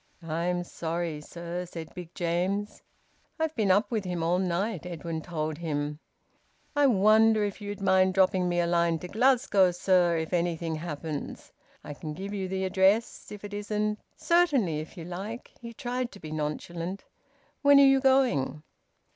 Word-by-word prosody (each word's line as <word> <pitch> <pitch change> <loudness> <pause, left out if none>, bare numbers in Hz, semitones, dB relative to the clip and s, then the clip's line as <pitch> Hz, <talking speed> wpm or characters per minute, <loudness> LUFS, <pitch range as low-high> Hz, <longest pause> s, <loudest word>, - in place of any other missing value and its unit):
"I'm 170 +2 -1
sorry, 165 -2 -4
sir," 175 +3 -6
said 165 -2 -8
Big 175 -1 -9
James. 185 +4 -1 0.6
"I've 320 -1 -1
been 215 -4 +1
up 200 +3 +3
with 220 -3 0
him 180 -3 -3
all 175 +2 +2
night," 190 +4 -1
Edwin 165 -2 -5
told 155 -2 -4
him. 150 -2 -3 0.8
"I 290 -1 +5
wonder 215 0 +5
if 205 0 -3
you'd 205 0 -6
mind 190 -1 +3
dropping 185 -1 +3
me 175 0 0
a 175 - +2
line 170 -1 +2
to 180 - -7
Glasgow, 235 -3 +3
sir, 175 -1 +2
if 160 +2 -3
anything 170 -2 -1
happens. 155 -2 -6 0.3
I 145 - -7
can 150 +1 -7
give 195 +4 -6
you 195 -2 -2
the 190 0 -2
address. 190 +4 +1
If 210 -1 -9
it 205 0 -7
isn't 210 +1 -2
" - - -38
"Certainly, 285 - +2
if 155 +3 -9
you 165 - -7
like." 195 +7 -6
He 235 -1 -7
tried 245 0 -3
to 200 - -12
be 155 -3 -8
nonchalant 165 +4 -4 0.6
"When 285 -1 +7
are - - +8
you 270 0 +5
going?" 260 - +2
180 Hz, 170 wpm, -28 LUFS, 170-210 Hz, 0.8 s, are